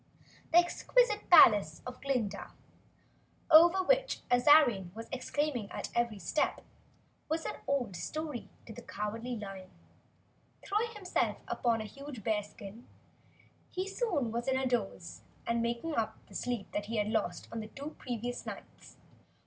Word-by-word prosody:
The 330 - +5
exquisite 425 +6 +2
palace 205 - +7
of 250 0 -8
Glinda, 250 -7 -2 1.0
over 345 +4 +8
which - - +2
Azarine 245 - +5
was 225 +1 -7
exclaiming 260 -4 -2
at - - -5
every 235 -3 0
step, 195 - -1 0.7
was 320 +1 -1
an - - -4
old 250 -9 0
story 300 - -5 0.2
to 225 - -9
the - - -9
Cowardly 225 +4 -4
Lion. 195 -3 -8 1.0
Throwing 430 +3 0
himself 385 -4 -1
down - - -4
on 230 -2 +2
a - - -5
huge 275 -1 -9
bearskin, 210 +1 -4 0.8
he 370 +1 -3
soon 360 - -1
was 235 +2 -3
in 265 0 +2
a 265 - 0
doze 200 -9 -2 0.2
and 235 0 0
making 235 +7 -2
up 225 -1 -1
the - - -18
sleep 240 -4 -3
he 225 +2 -4
had 210 0 +1
lost 205 -6 -1
on 230 - -4
the 215 - -6
two, 280 +6 -8
previous 245 0 -4
nights. - - -10
245 Hz, 145 wpm, -32 LUFS, 215-305 Hz, 1.0 s, over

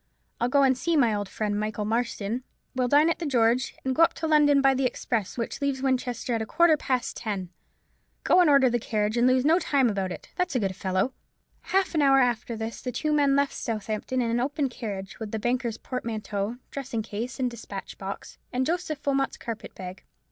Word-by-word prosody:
I'll 240 - +1
go 280 +1 +4
and 265 -1 +4
see 325 +6 0
my 235 -6 +4
old 205 -2 -3
friend 210 -1 -2
Michael 215 0 -2
Marston; 230 +1 -1 0.3
we'll 255 -1 +1
dine 290 +5 +5
at 335 - 0
the 340 - -3
George, 245 -1 +2
and 260 - +1
go 315 - +1
up 330 - +5
to 325 - -3
London 295 -2 +5
by 270 -1 +5
the 265 0 +2
express 230 -4 -3
which 230 +3 -4
leaves 275 -2 -1
Winchester 250 -2 -1
at 225 - 0
a - - -2
quarter 340 -1 +5
past 255 -4 -1
ten. 195 -5 -4 0.7
Go 365 - +5
and 345 - +5
order 275 -2 +6
the 240 -1 +1
carriage, 215 -1 -1
and 240 +1 +4
lose 255 +1 +3
no 325 +4 +5
time 270 -9 +2
about 195 -2 -2
it, - - -8
that's 360 -6 -1
a - - +3
good 195 -3 -1
fellow." 190 +6 0 0.5
Half 385 -1 +1
an 310 - +2
hour 275 -1 +5
after 240 -2 +1
this 225 +1 -5
the 250 - -3
two 300 +6 -1
men 285 -2 +3
left 280 0 +2
Southampton 220 +3 -2
in 230 - -1
an 235 - +1
open 280 +2 0
carriage, 205 -5 -6
with 220 -2 -5
the 220 - -1
banker's 240 0 -1
portmanteau, 220 -3 -4
dressing 260 -5 -3
case, 230 +5 -5
and 250 -2 0
despatch 210 -4 -8
box, 195 0 -7
and 255 +1 0
Joseph 320 -2 -2
Wilmot's 275 -1 0
carpet 230 -1 -7
bag. 185 0 -8
245 Hz, 215 wpm, -26 LUFS, 220-275 Hz, 0.7 s, order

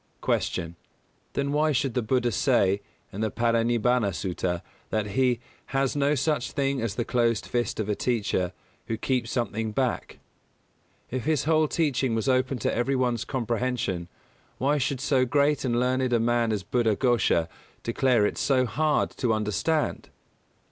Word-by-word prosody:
254. 85 -3 0
Q. - - -13 0.6
_Then 140 0 0
why 155 +1 +2
should 135 -2 0
the 125 - +1
Buddha 120 +1 +1
say, 100 -4 +2 0.3
in 100 - -4
the 110 - +1
Parinibbāna 115 -2 +1
Sutta, 90 +1 -2 0.3
that 110 -1 0
he 125 +2 +2 0.3
"has 135 0 0
no 145 +1 +2
such 140 -2 0
thing 140 -2 0
as 115 -4 -2
the 120 - -1
closed 115 -3 +1
fist 120 -3 -2
of 110 - -1
a 105 - +1
teacher, 100 -6 0 0.4
who 115 - -2
keeps 125 0 -1
something 115 -3 -2
back"? 125 +2 -2 0.9
If 130 -1 -3
his 155 -3 +1
whole 155 0 +3
teaching 140 -7 0
was 110 +3 -1
open 130 0 +2
to - - +1
every 120 +3 +1
one's 125 -3 0
comprehension 120 -7 -2 0.5
why 145 +3 +1
should 135 -1 -1
so 130 -2 +2
great 145 +3 +2
and 120 -2 +1
learned 130 0 +1
a 120 - +4
man 115 0 +2
as 105 -3 -1
Buddha 115 0 +1
Ghosha 115 -9 +2 0.4
declare 120 -2 +2
it - - -2
so 130 -2 +2
hard 150 +5 +1
to 120 -4 +1
understand? 110 +9 0
120 Hz, 160 wpm, -26 LUFS, 110-135 Hz, 0.9 s, a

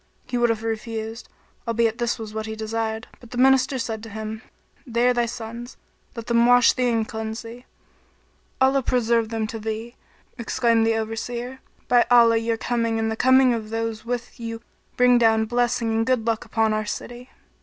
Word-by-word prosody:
He - - -5
would 240 -1 +3
have 225 -1 -1
refused, 225 0 -5 0.4
albeit 230 0 +1
this 240 -1 0
was 220 -2 -8
what 220 0 -4
he 220 - -5
desired; 220 0 -3
but 240 - -15
the 245 - -7
Minister 265 +1 +4
said 225 -3 -4
to 225 - -9
him, 220 +1 -6 0.4
"They 240 -1 +1
are 250 - +4
thy 240 -1 +1
sons; 235 +1 -7 0.4
let 230 -1 -6
them 235 0 +3
wash 245 -1 +6
thee 250 -1 +1
and 225 -2 0
cleanse 220 0 -5
thee." 235 +2 -11 0.9
"Allah 270 +1 +3
preserve 235 -3 +1
them 225 -1 -2
to 225 +1 -6
thee!" 220 +2 -5 0.5
exclaimed 230 -1 +2
the 225 - +2
Overseer, 235 +3 -4 0.3
"By 245 -1 +4
Allah 235 -2 +6
your 225 0 -1
coming 230 -1 -1
and 220 0 -1
the - - -2
coming 260 +1 +5
of 220 -2 -4
those 225 -1 -3
with 240 0 -5
you 230 0 -6 0.3
bring 250 0 +5
down 220 -1 +3
blessing 240 0 0
and 225 0 +1
good 245 -2 0
luck 225 -2 -1
upon 220 -1 +1
our 215 0 -1
city!" 245 +4 -6
230 Hz, 185 wpm, -23 LUFS, 220-240 Hz, 0.9 s, wash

